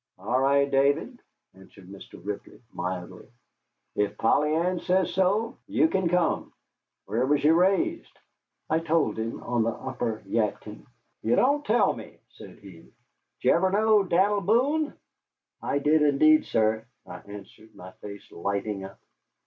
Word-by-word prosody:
"All 125 +1 -1
right, 140 +1 +3
David," 140 - +1 0.3
answered 95 0 -17
Mr. 100 +1 -12
Ripley, 105 +1 -7
mildly, 90 0 -6 0.7
"ef 105 -1 -1
Polly 150 +6 +2
Ann 175 +2 0
says 185 +1 0
so, 200 +5 0
you 305 +2 +3
kin 190 - 0
come. 180 0 0 0.6
Whar 120 +3 0
was 145 0 +1
you 155 +2 +5
raised?" 195 - +1 0.5
I 160 - +1
told 165 -6 0
him 115 +1 -4
on 120 -1 0
the 115 - +1
upper 115 -2 -4
Yadkin. 105 0 -3 0.3
"You 115 - +1
don't 285 +3 +2
tell 240 -2 +2
me," - - -11
said - - -14
he. - - -14
"Did - - -21 0.5
ye - - +5
ever 185 +2 +3
know 215 +2 +3
Dan'l 195 +3 +2
Boone?" 280 +9 +1 0.7
"I - - -1
did, 150 +2 +2
indeed, 150 +1 +4
sir," 110 +1 0 0.2
I - - -9
answered, 105 +2 -13
my 95 +1 -11
face 100 -1 -10
lighting 100 +2 -3
up. 95 0 -11
145 Hz, 150 wpm, -26 LUFS, -, 0.7 s, you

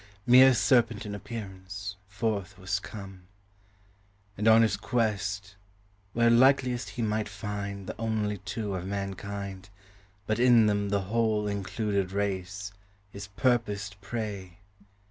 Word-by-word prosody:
Mere 130 +1 +8
serpent 115 -3 +3
in 105 - -5
appearance, 100 -2 -7
forth 100 -2 -2
was 100 +1 -2
come; 95 -3 -10 1.1
And 105 +3 -1
on 110 +1 +7
his 110 -3 +2
quest, 100 -5 -1 0.6
where 115 0 +4
likeliest 125 0 +4
he 120 - 0
might 110 -1 -1
find 100 -1 -5
The - - -6
only 110 -3 -1
two 105 0 -4
of 95 0 -4
mankind, 100 0 -5 0.6
but 110 +2 -1
in 120 -2 +6
them 100 -1 +1
The 100 0 +1
whole 105 +1 0
included 100 -1 -2
race, 100 0 -2 0.4
his 100 0 -8
purposed 100 -3 -1
prey. 100 -4 -5
100 Hz, 125 wpm, -28 LUFS, 100-110 Hz, 1.1 s, Mere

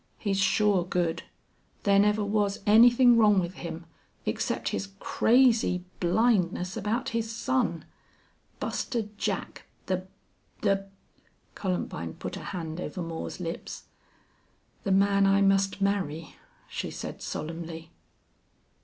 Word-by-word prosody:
He's 195 -2 -1
sure 200 -1 +3
good. 175 -2 -1 0.6
There 200 -1 +4
never 210 +1 +3
was 205 -1 0
anything 240 +3 +7
wrong 210 -3 +5
with 175 0 -2
him 170 -1 -7 0.4
except - - -1
his 200 - -3
crazy 230 -8 +3
blindness 185 -2 +1
about 235 +6 -1
his 230 -1 -2
son. 235 -7 -1 0.7
Buster 225 -4 -2
Jack - - -3 0.2
the 185 0 -2 0.5
the 195 -2 +1 0.3
" - - -38
Columbine 175 - -3
put - - -6
a - - -8
hand 170 -2 -5
over 185 - -5
Moore's 165 +2 -5
lips. 170 -1 -6 1.0
"The 195 - +1
man 200 0 +4
I 195 0 +4
must 195 0 +2
marry," 185 -6 -1 0.3
she - - -4
said, - - -7
solemnly. 165 +1 -6
195 Hz, 120 wpm, -28 LUFS, 175-215 Hz, 1.0 s, anything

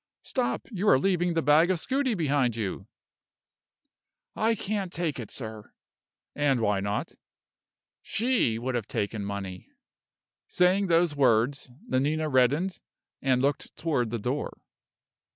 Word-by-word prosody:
Stop! 250 -2 -2
you 205 0 +1
are - - +7
leaving 175 +2 +1
the 165 - +1
bag 150 +5 +5
of 185 - +2
scudi 260 - 0
behind 140 - +1
you." 105 -5 -4 1.5
"I 225 +1 +2
can't 200 -3 -3
take 165 -6 -2
it, 115 - -6
sir." 110 -4 -7 0.6
"And 140 -3 +2
why 105 -3 +1
not?" 100 +1 -3 0.9
"She 230 - +1
would 130 +3 -3
have 120 -4 -2
taken 100 +1 -2
money!" 100 -2 -5 0.8
Saying 185 +2 +3
those 165 -2 +3
words, 130 0 +2 0.2
Nanina 150 +4 0
reddened, 145 +8 +2 0.4
and 130 -1 +2
looked 140 0 -1
toward 140 -8 0
the 120 - -2
door. 125 +7 -3
145 Hz, 130 wpm, -27 LUFS, 120-180 Hz, 1.5 s, are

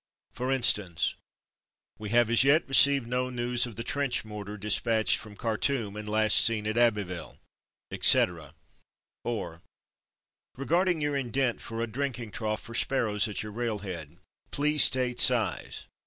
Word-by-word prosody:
For 130 +2 -3
instance: 105 - +1 0.9
"We 105 -1 -6
have 120 +1 +2
as 120 - +6
yet 145 +4 +3
received 140 -1 +5
no 125 +2 -2
news 120 0 -1
of 115 - -11
the 115 - -5
trench 140 -2 -2
mortar 105 -1 -8
dispatched 110 +2 +2
from 105 -1 -11
Khartoum, 115 -1 -2
and 105 0 -7
last 110 0 +3
seen 115 -2 +1
at 110 +1 -2
Abbeville/' 105 -7 -1 0.5
etc.; 80 -5 +2 0.7
or 105 -8 -5 1.0
"Re 140 - -6 0.3
your 145 -1 -2
indent 130 -2 -1
for 115 0 -5
a - - 0
drinking 120 -1 -5
trough 110 -1 -4
for 115 - -10
sparrows 115 -5 +1
at 105 - -4
your 105 - -8
railhead. 100 -8 -5 0.3
Please 150 +1 +2
state 125 -1 0
size. - - +1
115 Hz, 140 wpm, -27 LUFS, 105-125 Hz, 1.0 s, as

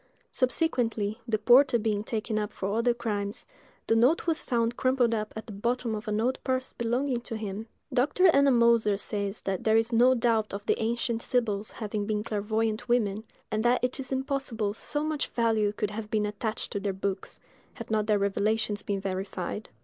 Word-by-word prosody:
Subsequently, 240 -6 0
the 220 -2 +1
porter 245 +4 +5
being 210 -2 0
taken 215 0 -2
up 210 0 -3
for 200 -1 -3
other 230 +2 +2
crimes, 210 -4 -3 0.4
the 225 - +2
note 250 +9 +3
was 330 -2 +2
found 235 -1 0
crumpled 255 -2 +2
up 215 -1 -2
at 220 - -6
the 220 - -9
bottom 235 +3 -1
of 215 +1 -5
an 210 0 0
old 250 +3 0
purse 260 0 -1
belonging 245 +2 0
to 230 -2 -5
him. 215 +1 -5 0.3
Dr. 280 +8 +2
Ennemoser 235 -6 +4
says 200 0 -2
that 190 -2 -3
there 220 0 +4
is 225 +1 +1
no 250 +3 +5
doubt 225 -4 +1
of 205 +1 -7
the - - +1
ancient 230 0 -1
Sibyls 215 -5 0
having 210 -2 -4
been 210 -1 -1
clairvoyant 220 +2 -1
women, 220 -3 +1 0.3
and 215 - 0
that 245 +1 +2
it 250 +2 0
is 260 -1 -6
impossible 260 -6 -1
so 295 +7 -2
much 310 -1 -1
value 225 -3 +1
could 210 0 -3
have 210 0 -6
been 210 -1 +1
attached 215 +1 -3
to 200 - -2
their 200 -1 -2
books, 190 0 -4 0.4
had - - -8
not 215 -1 +1
their 210 -1 +3
revelations 205 +1 0
been 200 -1 -2
verified. 190 +1 -4
225 Hz, 190 wpm, -28 LUFS, 210-245 Hz, 0.4 s, porter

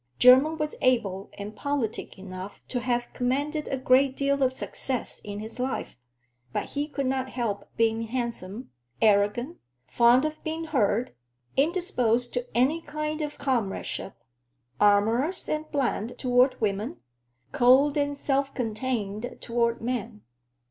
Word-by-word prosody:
Jermyn 265 +6 +7
was 305 -1 -2
able 205 -7 +1
and 205 +1 -7
politic 280 -8 -3
enough 190 +1 -8
to 250 - -1
have 240 0 -1
commanded 285 +5 -1
a 270 - -1
great 260 +1 +3
deal 280 0 +1
of 260 -1 +4
success 260 -1 -4
in 205 0 -6
his 220 +3 -7
life, 260 +1 -3 0.6
but - - -3
he 290 +1 -2
could 280 -2 -3
not 260 0 -1
help 220 -6 -3
being 225 0 +1
handsome, 235 -2 -4 0.3
arrogant, 215 +8 +2 0.3
fond 240 - +4
of 310 0 -4
being 320 +1 -3
heard, 250 -6 +1 0.4
indisposed 265 - +1
to 245 -1 -2
any 285 +7 +3
kind 305 +1 -3
of 295 -1 -4
comradeship, 230 -7 -2 0.6
amorous 225 - +3
and 305 0 -2
bland 245 -4 -1
toward 250 +1 +3
women, 200 - -1 0.5
cold 265 +4 +5
and 285 -1 0
self 275 -1 0
contained 220 -2 -3
toward 235 0 0
men. 230 - -3
250 Hz, 135 wpm, -27 LUFS, 225-280 Hz, 0.6 s, Jermyn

